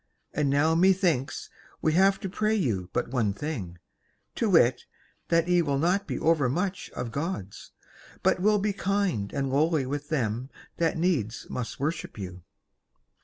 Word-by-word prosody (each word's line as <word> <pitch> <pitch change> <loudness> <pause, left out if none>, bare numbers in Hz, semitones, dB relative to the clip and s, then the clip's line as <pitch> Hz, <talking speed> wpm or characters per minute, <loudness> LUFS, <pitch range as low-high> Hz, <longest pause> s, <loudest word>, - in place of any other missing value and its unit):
And 150 -2 +1
now 145 +4 +3
methinks 170 -6 +2 0.3
we 155 - +1
have 195 +3 +4
to - - -3
pray 215 +3 0
you 105 - -1
but 120 - -1
one 115 -6 +1
thing, 105 - -5 0.6
to 225 - 0
wit 130 -9 +4 0.4
that 165 0 +2
ye 180 -1 +4
will 140 -4 0
not 180 +7 +1
be - - -2
overmuch 165 +5 +1
of 120 - -4
Gods, 140 - -5 0.5
but - - +3
will 210 +2 +4
be 205 0 0
kind 195 - -1
and 135 -1 -2
lowly 150 0 +2
with 145 +2 -4
them 125 -4 -1 0.3
that 165 -1 +1
needs 150 - 0
must 125 -2 -4
worship 155 +1 -3
you." 90 -3 -7
155 Hz, 155 wpm, -27 LUFS, 125-180 Hz, 0.6 s, have